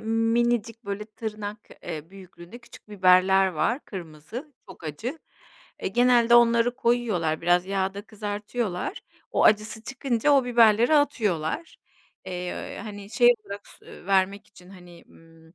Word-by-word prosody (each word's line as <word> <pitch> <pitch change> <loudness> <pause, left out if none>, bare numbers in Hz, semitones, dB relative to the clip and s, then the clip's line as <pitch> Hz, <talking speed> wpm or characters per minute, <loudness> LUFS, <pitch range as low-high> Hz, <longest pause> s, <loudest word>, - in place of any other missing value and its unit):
minicik 230 0 0
böyle 200 +1 -4
tırnak, 210 -1 -7
eee, 160 -1 -7
büyüklüğünde 185 +1 -13
küçük 235 -3 -17
biberler 190 -1 +4
var 190 - -1
kırmızı, 185 - -9 0.2
çok 190 - -13
acı. 225 - -5 0.6
Eee, - - 0
genelde 240 +2 +4
onları 235 0 +4
koyuyorlar, 215 -11 0
biraz 175 +1 +2
yağda 195 +1 -2
kızartıyorlar, 210 - -4 0.3
o - - +1
acısı 215 +1 +2
çıkınca 265 +1 -1
o 275 -2 +4
biberleri 235 +2 +4
atıyorlar. 230 - 0 0.5
Eee, 180 0 -5
hani, 205 -1 -9
şey, 240 +2 +5 0.2
bırak 200 0 -9
s - - -19
ııı, - - -13
vermek 195 +1 +1
için, 180 -2 -18
hani, 175 -3 -15
ımm, 165 0 -20
210 Hz, 130 wpm, -25 LUFS, 185-235 Hz, 0.6 s, şey